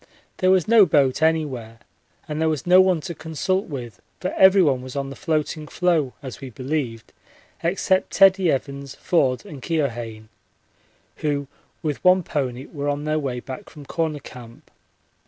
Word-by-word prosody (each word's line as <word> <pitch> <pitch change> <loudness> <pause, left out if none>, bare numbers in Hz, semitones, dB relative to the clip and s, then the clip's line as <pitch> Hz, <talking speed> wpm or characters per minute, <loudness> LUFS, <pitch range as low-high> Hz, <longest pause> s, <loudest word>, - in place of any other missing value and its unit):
There 185 - +2
was 185 -3 +3
no 220 -4 +7
boat 140 -3 +2
anywhere 140 -8 0 0.5
and 155 0 -3
there 160 - +3
was 155 +1 -2
no 180 +1 +7
one 185 -4 +2
to 170 +2 -5
consult 165 +5 -2
with, 125 -7 -7 0.2
for 185 - -3
everyone 185 -9 +5
was 130 +1 -9
on 135 -1 -3
the - - -8
floating 155 0 -2
floe 165 -8 +1
as 130 0 -8
we 135 - -7
believed, 125 -2 -4 0.5
except 185 +2 +1
Teddie 190 -3 +5
Evans, 140 0 -4
Forde, 130 -8 +1
and 145 -4 -10
Keohane, 120 -9 -3 0.9
who 145 -2 -1 0.4
with 150 -3 -3
one 185 0 +5
pony 135 -5 -3
were 145 -1 -4
on 145 0 -2
their 155 0 0
way 130 -4 -3
back 130 0 -8
from 150 -2 -12
Corner 160 0 -2
Camp. 120 -4 -13
150 Hz, 160 wpm, -23 LUFS, 130-170 Hz, 0.9 s, no